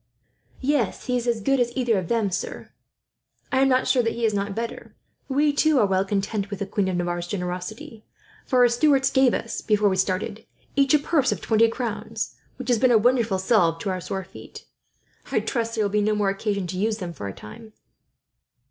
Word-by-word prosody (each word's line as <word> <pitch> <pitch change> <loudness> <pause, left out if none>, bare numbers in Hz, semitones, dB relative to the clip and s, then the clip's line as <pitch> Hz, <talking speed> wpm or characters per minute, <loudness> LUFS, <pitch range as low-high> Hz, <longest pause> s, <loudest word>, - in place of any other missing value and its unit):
"Yes, 265 -6 0
he 250 - 0
is 245 0 -2
as 230 -2 0
good 275 +6 +2
as 240 -1 +1
either 240 -5 +2
of 180 - -5
them, 225 -4 0
sir. - - -5 0.8
I 260 - +2
am 270 0 +4
not 255 0 +2
sure 255 -1 +3
that 230 -1 -1
he 235 0 -1
is 215 - +1
not 200 0 -2
better. 230 0 -6 0.3
We, 290 +2 +2
too, 310 0 +3
are 220 - +5
well 190 -1 +1
content 200 +1 -2
with 200 - -5
the 200 - -3
queen 195 0 -1
of 185 - -1
Navarre's 175 0 -2
generosity; 185 +4 -5 0.4
for 255 -1 +2
her 245 - +7
steward 270 +3 +3
gave 265 -2 +4
us, 230 - -4
before 210 -2 +2
we 190 - 0
started, 195 +3 -1 0.3
each 275 +1 +4
a - - +7
purse 285 -2 +1
of - - -2
twenty 225 0 +3
crowns, 230 -2 -4 0.2
which 260 -1 -7
has 240 -3 +3
been 255 +2 +4
a 235 - +6
wonderful 230 -3 +2
salve 185 -4 +2
to 195 - -2
our 185 -1 -3
sore 190 +2 -4
feet. - - -12 0.7
I - - +2
trust 230 -2 -2
there 220 - +1
will 200 - -1
be 210 0 +2
no 215 +1 +1
more 205 -2 +1
occasion 200 -1 -2
to 185 +1 -5
use 215 +1 0
them, 180 -5 -6
for 105 -10 -6
a - - -4
time." 215 - -12
220 Hz, 220 wpm, -24 LUFS, 195-245 Hz, 0.8 s, her